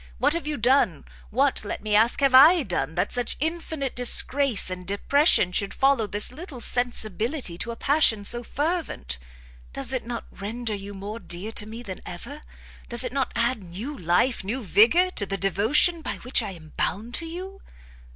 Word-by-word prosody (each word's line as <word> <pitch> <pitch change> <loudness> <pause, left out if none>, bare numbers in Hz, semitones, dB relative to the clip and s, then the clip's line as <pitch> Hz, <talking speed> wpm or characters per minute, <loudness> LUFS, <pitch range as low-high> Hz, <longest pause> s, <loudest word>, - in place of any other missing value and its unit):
what 285 +5 +2
have 335 -2 -3
you 300 -1 -2
done, 235 - +2 0.2
what, - - +1
let - - -5
me 210 -1 0
ask, 225 +6 +3
have 275 -2 +3
I 310 +6 +8
done, 175 -6 -3
that 180 - 0
such 245 -1 -1
infinite 320 -3 -2
disgrace 250 -3 +3
and 180 0 -5
depression 200 - +2
should 200 +2 -2
follow 270 -5 +2
this 205 +3 -3
little 290 -1 -9
sensibility 235 - 0
to 235 - -4
a 235 - -4
passion 230 -7 +2
so 240 +3 +1
fervent? 290 - -3 0.5
Does 235 - -4
it 255 - -1
not 235 0 -6
render 220 +3 -5
you 200 0 -7
more 205 +3 -6
dear 185 +2 -4
to 210 -1 -4
me 230 +2 -8
than 190 -5 -7
ever? 280 +12 -9 0.5
does 235 +1 +1
it 250 -1 -4
not 275 -1 -1
add 235 0 0
new 200 +12 -7
life, 180 +7 +1
new 235 +6 -3
vigour, 245 - +4
to 200 - -1
the 195 - -3
devotion 220 - +3
by - - -4
which 250 +1 +1
I 215 - -4
am 155 -3 -13
bound 225 +5 -2
to 330 - -2
you?" 375 +4 -8
235 Hz, 185 wpm, -25 LUFS, 200-280 Hz, 0.5 s, I